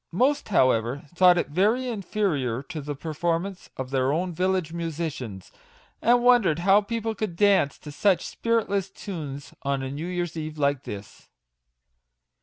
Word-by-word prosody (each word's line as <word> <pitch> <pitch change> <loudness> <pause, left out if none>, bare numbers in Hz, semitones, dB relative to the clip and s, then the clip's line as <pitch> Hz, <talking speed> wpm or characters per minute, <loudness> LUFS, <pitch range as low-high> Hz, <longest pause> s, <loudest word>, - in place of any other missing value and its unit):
Most, 265 +11 +1
however, 130 - +2
thought 180 0 +6
it 175 - 0
very 215 - +2
inferior 180 - -1
to 155 +2 -6
the 145 +1 -5
performance 170 +5 -3
of 130 0 -5
their 130 0 +2
own 175 +4 -1
village 180 -1 0
musicians, 155 - -5 0.5
and 240 +1 +4
wondered 240 -11 +5
how 200 +1 +6
people 225 +1 -3
could 210 -4 -4
dance 195 -7 +3
to 150 - -10
such 180 +3 +2
spiritless 205 -4 0
tunes 150 -8 -7
on 140 -1 -1
a 130 - -4
new 150 +5 -4
year's 175 -2 -3
eve 155 -1 -5
like 140 -2 0
this. 100 0 -9
170 Hz, 150 wpm, -26 LUFS, 145-200 Hz, 0.5 s, thought